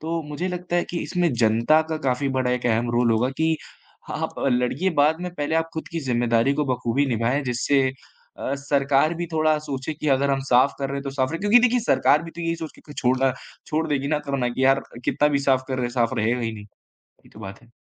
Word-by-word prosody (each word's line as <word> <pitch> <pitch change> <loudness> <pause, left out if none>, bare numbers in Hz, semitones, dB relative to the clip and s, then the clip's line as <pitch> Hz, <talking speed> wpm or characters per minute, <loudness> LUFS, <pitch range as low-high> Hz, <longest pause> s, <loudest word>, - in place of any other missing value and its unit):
तो 165 +1 -3
मुझे 150 +5 -3
लगता 180 -1 -3
है 175 - +1
कि 170 - -3
इसमें 175 -5 0
जनता 115 +8 +4
का 160 - 0
काफ़ी 130 +2 +1
बड़ा 125 -1 +1
एक 125 0 -1
अहम 120 +1 +1
रोल 120 -1 +2
होगा 115 +3 +2
कि 160 0 +2 0.5
आप - - -3 0.2
लड़िए 125 +9 0
बाद 155 +2 +2
में, 180 - -4
पहले 150 +1 -2
आप 165 0 +1
ख़ुद 160 - -5
की 165 - -2
ज़िम्मेदारी 120 +1 +2
को 150 - 0
बखूबी 125 +3 0
निभाएँ 125 +4 0
जिससे 130 +2 +1 0.5
अ, 140 - -2
सरकार 140 +2 +1
भी 170 +1 -4
थोड़ा 155 -1 +2
सोचे 145 0 -5
कि 150 +1 -3
अगर 140 +1 +2
हम 135 0 +1
साफ़ 125 +3 +4
कर 135 0 -3
रहे 140 - -3
तो 140 - -4
साफ़ 135 0 -1
रहे 165 - -3
क्योंकि 210 +4 +5
देखिए 245 +1 +3
सरकार 155 -8 +3
भी 165 - -8
तो 170 - -10
यही 165 0 -1
सोच 160 -2 -7
के - - -17
कि 145 - -10
छोड़ 125 0 +2
ना 135 -1 +3 0.3
छोड़ 160 +1 -1
देगी 140 -1 -1
ना 150 -1 +1
करना 135 -3 0
कि 130 +2 -1
यार 135 0 +4 0.2
कितना 150 - +2
भी 145 -1 +1
साफ़ 130 -1 +3
कर 130 - -2
रहे, 125 -1 -1
साफ़ 120 0 0
रहेगा 115 +3 +1
ही 115 -1 -2
नहीं। 105 -1 -9 0.4
यही - - -26
तो 110 - -15
बात 95 -1 -9
है। 120 - -21
140 Hz, 240 wpm, -23 LUFS, 125-160 Hz, 0.5 s, क्योंकि